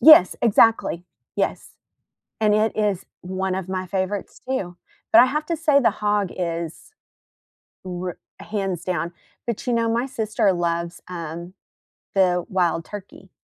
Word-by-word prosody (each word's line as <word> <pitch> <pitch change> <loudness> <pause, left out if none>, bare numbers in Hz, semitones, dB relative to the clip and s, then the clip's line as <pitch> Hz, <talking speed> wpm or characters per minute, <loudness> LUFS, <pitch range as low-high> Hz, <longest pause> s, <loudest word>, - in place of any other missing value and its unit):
Yes, 305 - +9
exactly. 225 -5 +4 0.3
Yes, - - -1 0.7
and 210 -1 +4
it 215 +1 +2
is 205 -4 0 0.2
one 185 +1 -2
of 190 -1 -4
my 185 0 -2
favorites, 190 +2 -3
too, 190 -10 -2 0.3
but 335 - +9
I - - +7
have 300 +4 -1
to 335 - -1
say 300 -3 +4
the 250 - +4
hog 205 -2 +2
is 170 - -4 0.9
r 180 0 -4 0.2
hands 195 -5 -3
down 175 -2 -1 0.3
but, 235 +1 -3
you 245 - +2
know, 230 -1 +2
my 235 +2 +1
sister 215 -6 +1
loves, 170 0 -2
um, 170 +1 -6 0.6
the 180 -2 +3
wild 175 -3 +1
turkey. 195 -2 -10
190 Hz, 145 wpm, -23 LUFS, 175-220 Hz, 0.9 s, Yes